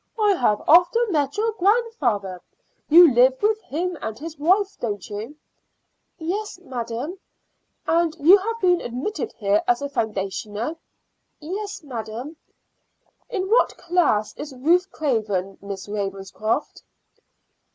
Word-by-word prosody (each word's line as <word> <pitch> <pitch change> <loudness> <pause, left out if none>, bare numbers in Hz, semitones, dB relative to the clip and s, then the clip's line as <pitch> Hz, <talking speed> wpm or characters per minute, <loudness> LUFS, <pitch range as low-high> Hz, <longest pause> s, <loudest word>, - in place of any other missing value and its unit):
"I 420 -1 +4
have 235 - +1
often 360 +8 +5
met 285 -2 0
your 450 +2 +1
grandfather. 290 - +1 0.5
You 330 -2 +8
live 255 +2 +4
with 435 +1 +1
him 350 +1 -3
and 220 - -5
his 315 0 -8
wife, 385 +6 +2
don't 205 -5 -4
you?" 215 +7 -7 0.8
"Yes, 390 +6 -4
madam." 255 +2 -5 0.7
"And 330 -1 +1
you 335 +6 +7
have 455 +4 -4
been 360 -4 +3
admitted 350 - -4
here 205 -1 +1
as 240 0 +3
a 280 - -3
foundationer?" 210 - -3 0.6
"Yes, 400 +5 -6
madam." 245 +2 -6 0.9
"In 390 -6 -2
what 475 - +3
class 335 -12 +1
is 290 -2 -7
Ruth 345 +8 +2
Craven, 210 -9 -2
Miss 200 0 -7
Ravenscroft?" 200 +1 -3
295 Hz, 120 wpm, -23 LUFS, 220-365 Hz, 0.9 s, You